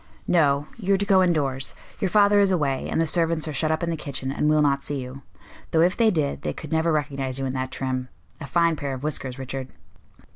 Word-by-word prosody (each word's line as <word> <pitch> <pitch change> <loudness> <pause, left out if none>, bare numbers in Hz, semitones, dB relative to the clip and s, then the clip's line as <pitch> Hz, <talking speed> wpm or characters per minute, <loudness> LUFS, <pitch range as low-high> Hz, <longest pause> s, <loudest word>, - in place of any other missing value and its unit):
"No. 145 -4 +3
You 200 -3 +1
are - - +1
to 200 - -1
go 195 -2 +5
indoors. 145 -7 0 0.2
Your 195 - 0
father 205 +1 +5
is 200 -1 +4
away, 145 -8 0
and - - 0
the 165 - +3
servants 165 -1 +1
are 155 - -3
shut 155 +2 0
up 160 +1 -1
in 170 - 0
the - - -1
kitchen 140 -3 -5
and 150 +2 +1
will 155 0 +4
not 140 -1 +2
see 145 0 -4
you. 130 +1 -8 0.5
Though 160 - +3
if 180 +3 +3
they 230 -2 +4
did, 155 -8 -1
they - - -2
could 155 - -9
never 160 +1 +2
recognize 140 -4 -2
you 135 - -2
in 130 - -2
that 130 0 -2
trim. 130 -1 -3 0.3
A 140 - -7
fine 170 0 +2
pair 140 -2 -3
of 130 - -9
whiskers, 135 -4 -3
Richard." 130 0 -5
150 Hz, 245 wpm, -24 LUFS, 135-170 Hz, 0.5 s, go